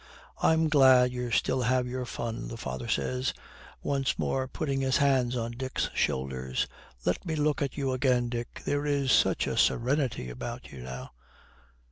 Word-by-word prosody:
'I'm 160 0 +4
glad 130 -4 +6
you 125 -1 -3
still 125 +2 +1
have 125 +1 +2
your 125 0 -3
fun,' 115 0 -4
the 115 - -6
father 65 - -5
says, 65 -2 -1 0.5
once 135 -1 0
more 130 -1 0
putting 135 -1 -2
his 130 -1 +2
hands 130 -3 +2
on 115 0 -2
Dick's 130 +2 -3
shoulders. 65 -1 -1 0.4
'Let 90 - 0
me 160 -3 -2
look 150 -1 +1
at 140 0 -2
you 135 -2 0
again, 125 -1 +2
Dick. 120 0 -5
There 145 +1 0
is 140 -2 +1
such - - +4
a - - -2
serenity 125 - +1
about - - -7
you 65 - -9
now.' 65 +1 -7
125 Hz, 165 wpm, -29 LUFS, 115-135 Hz, 0.5 s, glad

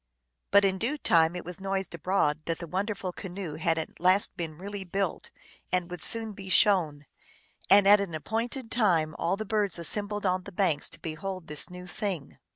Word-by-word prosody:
But 200 0 +5
in 190 -1 0
due 260 +8 -1
time 165 - +3
it 175 - -6
was 180 +1 -6
noised 195 -1 -3
abroad 160 -3 0
that 165 -1 -1
the 170 - -7
wonderful 190 +2 -3
canoe 185 -4 -6
had 165 +1 +1
at 160 - -5
last 185 +3 +3
been 165 -4 -5
really 200 +2 -6
built, 190 0 -3 0.4
and 180 -1 0
would 180 -2 -6
soon 225 -2 +4
be 195 -1 -9
shown. 170 -9 +3 0.6
And 200 0 +7
at 205 +1 +8
an 190 -5 -3
appointed 230 - -3
time 170 -9 +2
all 170 +4 0
the 220 - -4
birds 205 -3 +1
assembled 205 +4 -2
on 185 0 +1
the 200 - -8
banks 175 -6 +1
to - - -8
behold 180 +3 -5
this 150 +2 -3
new 180 0 -9
thing. 180 -5 -5
185 Hz, 190 wpm, -28 LUFS, 170-200 Hz, 0.6 s, at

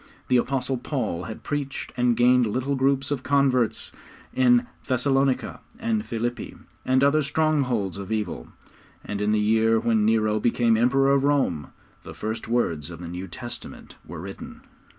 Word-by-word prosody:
The 125 - +5
Apostle 130 +1 -1
Paul 120 - -3
had 110 - -8
preached 145 -2 -4
and 125 -1 +2
gained 125 0 +4
little 130 +6 -1
groups 135 +1 +1
of 140 -3 -1
converts 130 -4 +1 0.4
in 125 -1 +4 0.2
Thessalonica 135 0 +1 0.2
and 225 -1 -1
Philippi 120 - -4 0.3
and 130 +1 +2
other 145 +2 +4
strongholds 140 - 0
of 100 +2 -7
evil, 105 - -3 0.6
and 105 0 -4
in 105 +1 +1
the 110 - +2
year 110 +1 +3
when 110 -2 +1
Nero 110 -1 +2
became 115 0 +2
Emperor 135 +4 +3
of 140 -1 +2
Rome, 135 - +1 0.3
the - - -10
first 110 +1 -4
words 85 -11 0
of 85 -2 -9
the 90 - -7
New 90 +2 -6
Testament 120 +7 -9
were 85 0 -9
written. 95 +3 -9
120 Hz, 155 wpm, -25 LUFS, 110-135 Hz, 0.6 s, The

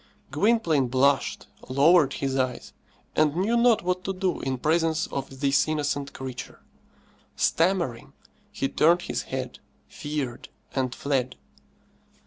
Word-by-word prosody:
Gwynplaine 185 - +2
blushed, 135 +2 +1 0.2
lowered 145 +2 +4
his 135 -1 -2
eyes, 130 -2 -2 0.4
and 150 -1 +3
knew 200 +7 +1
not 235 -3 +4
what 180 +1 -1
to 195 - -1
do 185 -1 -1
in 130 -1 -2
presence 160 +3 +1
of 135 -1 -6
this 140 +1 +3
innocent 145 -2 -2
creature. 130 -2 -8 0.8
Stammering, 170 -9 0 0.4
he 135 - -1
turned 170 +5 +3
his - - -3
head, 130 -1 -4 0.3
feared, 145 -5 -5 0.2
and 130 -3 -1
fled. 130 -3 -1
145 Hz, 120 wpm, -26 LUFS, 130-170 Hz, 0.8 s, lowered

